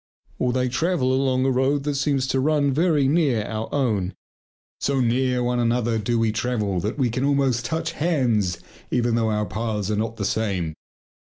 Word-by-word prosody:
Or 125 - +1
they 125 0 0
travel 135 0 +1
along 130 -1 +1
a 135 - +3
road 135 +2 +1
that 145 0 -1
seems 140 -1 0
to 135 - +1
run 145 0 +2
very 155 -2 +2
near 140 -7 +2
our 110 0 -4
own. 105 -9 0 0.6
So 140 -1 0
near 125 +1 +1
one 125 0 0
another 120 -1 +1
do 115 +3 0
we 115 -1 +2
travel 110 -4 -1
that 105 - -3
we 125 -5 +1
can 125 +3 -2
almost 135 -4 +1
touch 160 +5 -2
hands 125 - 0 0.3
even 120 -1 +1
though 115 -1 +1
our 105 0 0
paths 110 -2 -3
are - - +1
not 115 +2 -2
the 100 - -2
same. 95 -7 -1
125 Hz, 185 wpm, -23 LUFS, 110-135 Hz, 0.6 s, a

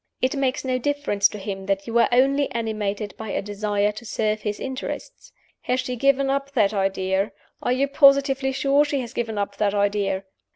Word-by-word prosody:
It 260 +3 0
makes 270 -1 -1
no 255 -1 0
difference 285 -7 +1
to - - -8
him 195 -1 -6
that 195 0 0
you 230 +1 +1
are - - +4
only 275 +3 +3
animated 215 -3 -2
by 220 -1 -6
a - - -1
desire 205 0 0
to 215 +3 -10
serve 215 -1 -1
his 210 -1 -3
interests. 265 0 -6 0.3
'Has 250 +1 +1
she 250 0 -3
given 275 +2 +2
up 275 +1 -1
that 215 -6 +3
idea? 195 0 0 0.3
Are - - 0
you 265 +2 +2
positively 275 -1 +4
sure 275 +2 +3
she 290 -2 -1
has 240 0 -7
given 225 -4 -3
up 200 0 -3
that 205 -1 +1
idea? 200 -1 0
230 Hz, 195 wpm, -23 LUFS, 205-270 Hz, 0.3 s, are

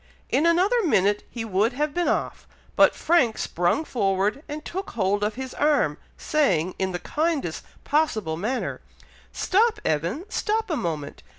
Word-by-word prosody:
In 315 - +3
another 375 +8 +3
minute 205 - +2
he 230 -2 -5
would 210 +3 +1
have 295 +2 -1
been 350 +1 0
off, - - -2 0.3
but - - +5
Frank 275 -10 +2
sprung 175 - 0
forward 200 +1 0
and 300 +1 -6
took 380 +2 -5
hold 205 -1 0
of 210 +1 -1
his 260 0 -6
arm, 295 -1 +1 0.2
saying, 185 - +1
in 190 0 0
the 175 - -2
kindest 300 - -2 0.2
possible 225 - 0
manner, 220 +10 -3 0.5
"Stop, 445 +3 +2
Evan! 170 - -1
Stop 435 -1 -1
a - - +1
moment! 155 - -4
250 Hz, 155 wpm, -25 LUFS, 190-320 Hz, 0.5 s, but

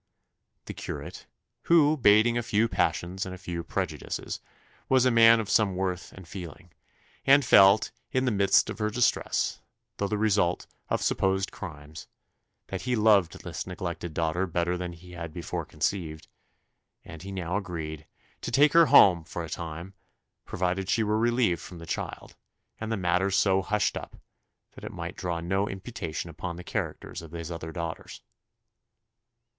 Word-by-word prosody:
The - - -6
curate, - - -7 0.4
who, 155 -3 +5
bating 115 -2 +5
a 120 - +1
few 110 0 +1
passions 95 -3 -1
and 95 0 -6
a - - -11
few 85 -2 -5
prejudices, - - -4 0.5
was 130 -1 +4
a 130 - +4
man 115 0 +7
of 110 - -3
some 100 -2 +2
worth 90 -1 -3
and 95 -3 -12
feeling, 90 -2 -9 0.5
and 140 0 +5
felt, 100 -1 +6 0.2
in 130 0 +1
the 125 - +2
midst 100 -2 +3
of - - -8
her 105 0 0
distress, 120 +3 0 0.4
though 100 - -1
the 105 - -1
result 100 -4 +1 0.2
of - - 0
supposed 95 0 +1
crimes, 75 -5 -9 0.6
that - - -4
he 125 -1 0
loved 105 -6 +3
this - - -5
neglected 85 -3 -5
daughter 85 +3 0
better 85 +1 0
than 90 -1 -4
he 90 +2 -14
had 85 -2 -7
before 85 +1 -4
conceived; 80 -5 -3 0.8
and 80 -2 -10
he 100 +2 -7
now 90 -2 -3
agreed 80 -6 -5 0.3
"to - - -4
take 145 +4 +4
her 165 -1 +7
home 90 -4 +7
for 85 +1 -6
a 80 - -7
time, 85 +3 -6 0.5
provided 95 +1 -2
she 115 - +2
were 105 +1 +1
relieved 120 -6 +2
from 90 - -10
the 85 - -9
child, 80 - -5 0.4
and 110 0 -4
the 110 - 0
matter 90 +1 +1
so 95 0 +3
hushed 105 +2 0
up, - - -7 0.6
that - - -14
it - - -6
might - - -6
draw 85 -2 -3
no 95 +4 -1
imputation 95 -5 -5
upon 85 +2 -6
the 90 - -9
characters 85 - -4
of 80 -1 -12
his 85 0 -6
other 80 -1 -6
daughters." 85 -1 -6
95 Hz, 165 wpm, -27 LUFS, 85-105 Hz, 0.8 s, man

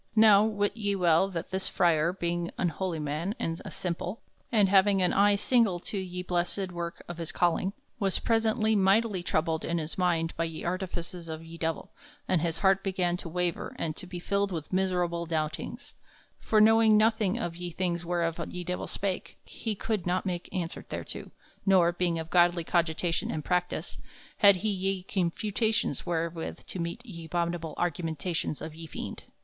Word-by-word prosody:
Now 215 -2 +7
wit 205 -1 0
ye 205 -3 0
well 175 0 +4
that 170 -2 -5
this 190 0 -1
frere, 170 -1 +3
being 175 -1 -2
an 175 - +1
holy 180 0 -3
man 155 +7 -2
and 165 +1 -3
a - - -6
simple, 180 +3 -4 0.3
and 210 -5 +5
having 195 +1 +5
an 180 -1 +2
eye 205 +1 +5
single 210 -3 +3
to - - -6
ye 180 -1 -4
blessed 180 +2 -1
works 170 -1 -5
of 175 -1 -7
his 165 0 -3
calling, 175 +2 +1 0.3
was 195 -3 +2
presently 220 -1 +2
mightily 200 0 +3
troubled 160 -1 0
in 170 - -1
his 160 +3 -4
mind 170 -2 +1
by 165 - 0
ye 165 -1 -6
artifices 175 -1 -4
of 160 +1 -6
ye 165 +1 -10
Divell, 165 -1 -3 0.4
and 180 -4 +2
his 165 -1 -1
harte 195 0 +3
began 185 -3 0
to 175 - -7
waver 175 0 -2
and 155 -2 -2
to 185 - -8
be 180 0 -6
filled 200 +3 0
with 160 -1 -5
miserable 180 -2 0
doubtings; 165 - -3 0.5
for 215 - +2
knowing 220 0 +6
nothing 220 -1 +3
of 175 -8 -3
ye 175 0 -5
things 175 0 -1
whereof 170 -1 -1
ye 180 0 -5
Divell 180 +1 -3
spake, 195 -2 -3
he 220 -2 -4
colde 205 -3 -2
not 180 +2 0
make 180 -2 -3
answer 175 -3 -3
thereto, - - -5 0.3
nor, 185 -3 +5
being 175 -1 0
of 160 0 -5
godly 175 -1 +4
cogitation 170 0 0
and 155 -2 -3
practice, 180 -1 -1 0.4
had 200 -2 +7
he 215 +4 -1
ye 195 -1 -1
confutations 205 - -1
wherewith 165 -1 -3
to 185 - -6
meet 170 +8 -4
ye 170 -8 -8
abhominable 170 -1 -2
argumentations 165 -2 -2
of 160 - -6
ye 165 +1 -8
fiend. - - -7
180 Hz, 180 wpm, -29 LUFS, 170-195 Hz, 0.5 s, Now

